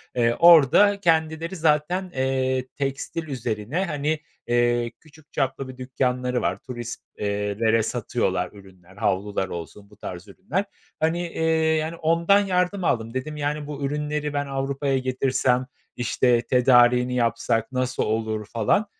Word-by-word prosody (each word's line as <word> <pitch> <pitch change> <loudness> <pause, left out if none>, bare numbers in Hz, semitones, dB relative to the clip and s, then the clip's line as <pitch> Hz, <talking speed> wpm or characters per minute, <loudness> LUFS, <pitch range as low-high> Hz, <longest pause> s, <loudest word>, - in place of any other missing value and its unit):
Eee, 120 -1 +2
orada 175 +5 +7
kendileri 165 0 +1
zaten, 165 +4 +1
eee, 130 -1 0
tekstil 140 +4 -3
üzerine, 125 - -2
hani, 150 -1 -1 0.3
eee, 120 0 +2
küçük 155 -1 -21
çaplı 135 -1 -1
bir 130 -1 -10
dükkânları 125 -1 -1
var. - - 0
Turist 120 -2 -6 0.2
eee, 105 0 -2
lere 115 -1 +3
satıyorlar 110 -6 -1
ürünler, 95 -2 -17
havlular 100 -2 -1
olsun, 100 +4 -8
bu 105 - -19
tarz 90 +2 -8
ürünler. 175 - -3 0.3
Hani, 160 +2 +1
eee, 160 - -4 0.3
yani, 160 +2 -2
ondan 170 +5 +3
yardım 185 -1 0
aldım. 115 -5 0
Dedim, 150 +4 -4
yani, 150 0 -2
"Bu 145 -1 -6
ürünleri 150 +1 -2
ben 145 0 -1
Avrupa'ya 135 0 -1
getirsem, 130 -1 +1 0.3
işte, 120 0 +2
tedariğini 125 0 +4
yapsak 115 0 0
nasıl 130 0 -1
olur?" 110 -1 -2
falan. 115 - +1
130 Hz, 135 wpm, -24 LUFS, 115-150 Hz, 0.3 s, orada